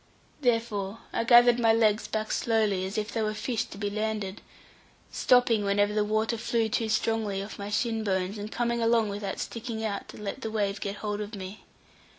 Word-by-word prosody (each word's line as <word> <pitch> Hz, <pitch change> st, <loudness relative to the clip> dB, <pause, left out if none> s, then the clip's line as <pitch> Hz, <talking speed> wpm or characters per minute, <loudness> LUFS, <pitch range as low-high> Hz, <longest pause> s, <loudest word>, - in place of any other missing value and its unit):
Therefore 230 Hz, -5 st, 0 dB, 0.2 s
I -, -, 0 dB
gathered 240 Hz, 0 st, +7 dB
my 225 Hz, -1 st, +5 dB
legs 220 Hz, -1 st, +2 dB
back 215 Hz, 0 st, -2 dB
slowly, 215 Hz, -5 st, +1 dB
as 195 Hz, -, -5 dB
if 215 Hz, 0 st, -2 dB
they 225 Hz, -, -1 dB
were 215 Hz, 0 st, -1 dB
fish 225 Hz, +1 st, -1 dB
to 195 Hz, -, -11 dB
be 205 Hz, 0 st, -2 dB
landed, 215 Hz, -2 st, -3 dB, 0.7 s
stopping 245 Hz, -4 st, +3 dB
whenever 205 Hz, +1 st, +2 dB
the 210 Hz, 0 st, +2 dB
water 220 Hz, +2 st, 0 dB
flew 230 Hz, -1 st, 0 dB
too 220 Hz, +1 st, -1 dB
strongly 215 Hz, -3 st, 0 dB
off 205 Hz, -, -9 dB
my 200 Hz, 0 st, -5 dB
shin 225 Hz, +1 st, 0 dB
bones, 190 Hz, 0 st, -1 dB
and 210 Hz, +1 st, -6 dB
coming 235 Hz, 0 st, 0 dB
along 230 Hz, -2 st, +3 dB
without 200 Hz, -1 st, -4 dB
sticking 230 Hz, -1 st, -4 dB
out 200 Hz, -2 st, -3 dB
to -, -, -11 dB
let 210 Hz, +6 st, -5 dB
the 220 Hz, -, -3 dB
wave 200 Hz, -2 st, -1 dB
get 200 Hz, 0 st, -3 dB
hold 210 Hz, 0 st, -3 dB
of 210 Hz, +1 st, -6 dB
me. 190 Hz, +1 st, -8 dB
215 Hz, 195 wpm, -28 LUFS, 205-230 Hz, 0.7 s, gathered